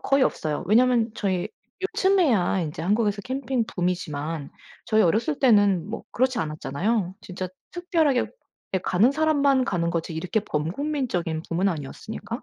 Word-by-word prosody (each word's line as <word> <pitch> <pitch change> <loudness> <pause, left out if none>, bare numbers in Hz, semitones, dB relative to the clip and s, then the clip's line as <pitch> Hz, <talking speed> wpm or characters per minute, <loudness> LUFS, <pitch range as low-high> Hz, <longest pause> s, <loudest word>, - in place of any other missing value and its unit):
거의 275 0 +2
없어요. 155 -4 -2
왜냐하면 235 +2 +4
저희 185 -3 -1 0.5
요즘에야 305 - +3
인제 160 -1 -4
한국에서 205 +2 +1
캠핑 260 -1 -1
붐이지만 165 -5 -3 0.3
저희 220 0 +3
어렸을 230 - +1
때는 205 - +4
뭐 225 - -5
그렇지 255 0 +1
않았잖아요. 175 +6 -1
진짜 185 0 -6 0.2
특별하게 330 -7 +1 0.5
예 190 - +3
가는 185 +7 +3
사람만 280 -3 +3
가는 170 -6 0
거지 165 -1 -2
이렇게 180 +7 -1
범국민적인 180 - -2
붐은 180 +4 +1
아니었으니까. 195 - -5
205 Hz, 360 characters per minute, -25 LUFS, 170-255 Hz, 0.5 s, 왜냐하면